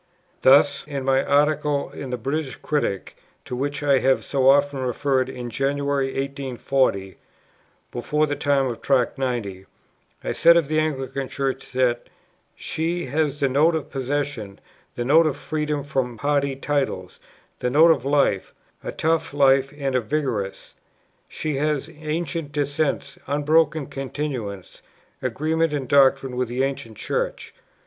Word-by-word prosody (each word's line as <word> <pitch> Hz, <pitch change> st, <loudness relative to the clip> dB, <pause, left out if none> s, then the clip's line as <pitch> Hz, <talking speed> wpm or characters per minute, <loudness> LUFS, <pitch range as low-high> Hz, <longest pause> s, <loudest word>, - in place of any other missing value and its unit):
Thus, 140 Hz, +1 st, +5 dB
in 140 Hz, -3 st, -4 dB
my 135 Hz, 0 st, +3 dB
Article 145 Hz, 0 st, +1 dB
in 135 Hz, -, -7 dB
the 125 Hz, -, -2 dB
British 135 Hz, +3 st, -3 dB
Critic, 145 Hz, -10 st, -2 dB, 0.3 s
to 125 Hz, -, -5 dB
which 140 Hz, +3 st, -2 dB
I 140 Hz, -2 st, +4 dB
have 130 Hz, 0 st, +2 dB
so 135 Hz, -1 st, +2 dB
often 140 Hz, 0 st, +3 dB
referred, 130 Hz, +1 st, 0 dB
in 120 Hz, -2 st, -6 dB
January, 140 Hz, +1 st, 0 dB
1840 135 Hz, -7 st, -1 dB, 0.7 s
(before 150 Hz, +5 st, 0 dB
the 145 Hz, -1 st, -2 dB
time 140 Hz, -2 st, +2 dB
of 120 Hz, -3 st, -4 dB
Tract 135 Hz, 0 st, +1 dB
90), 105 Hz, -8 st, -3 dB, 0.6 s
I -, -, -2 dB
said 170 Hz, +1 st, +6 dB
of 160 Hz, -4 st, +1 dB
the 155 Hz, 0 st, +2 dB
Anglican 135 Hz, -3 st, -2 dB
Church 135 Hz, -1 st, -3 dB
that 125 Hz, -2 st, +1 dB, 0.5 s
"she 170 Hz, +2 st, -2 dB
has 145 Hz, +1 st, -1 dB
the 140 Hz, -, +4 dB
note 150 Hz, +5 st, +3 dB
of 155 Hz, -, -4 dB
possession, 135 Hz, -6 st, -3 dB, 0.4 s
the 120 Hz, -, -3 dB
note 160 Hz, +5 st, +5 dB
of 145 Hz, -2 st, -2 dB
freedom 150 Hz, -1 st, -2 dB
from 130 Hz, -4 st, -2 dB
party 140 Hz, +1 st, 0 dB
titles, 135 Hz, -10 st, -2 dB, 0.4 s
the 125 Hz, -, 0 dB
note 160 Hz, +6 st, +6 dB
of 140 Hz, -7 st, +1 dB
life, 140 Hz, -8 st, +1 dB, 0.3 s
a -, -, -4 dB
tough 160 Hz, -2 st, 0 dB
life 135 Hz, -1 st, +4 dB
and 135 Hz, -2 st, -2 dB
a 125 Hz, -, +2 dB
vigorous; 115 Hz, -6 st, -3 dB, 0.6 s
she 150 Hz, -3 st, -3 dB
has 150 Hz, +1 st, -1 dB
ancient 155 Hz, -1 st, -3 dB
descent, 145 Hz, 0 st, -1 dB
unbroken 150 Hz, +1 st, +2 dB
continuance, 135 Hz, -8 st, -5 dB, 0.4 s
agreement 155 Hz, +6 st, 0 dB
in 140 Hz, -3 st, -2 dB
doctrine 135 Hz, -1 st, +3 dB
with 125 Hz, 0 st, 0 dB
the 125 Hz, +3 st, -1 dB
Ancient 125 Hz, -5 st, -4 dB
Church." -, -, -3 dB
140 Hz, 145 wpm, -23 LUFS, 130-150 Hz, 0.7 s, said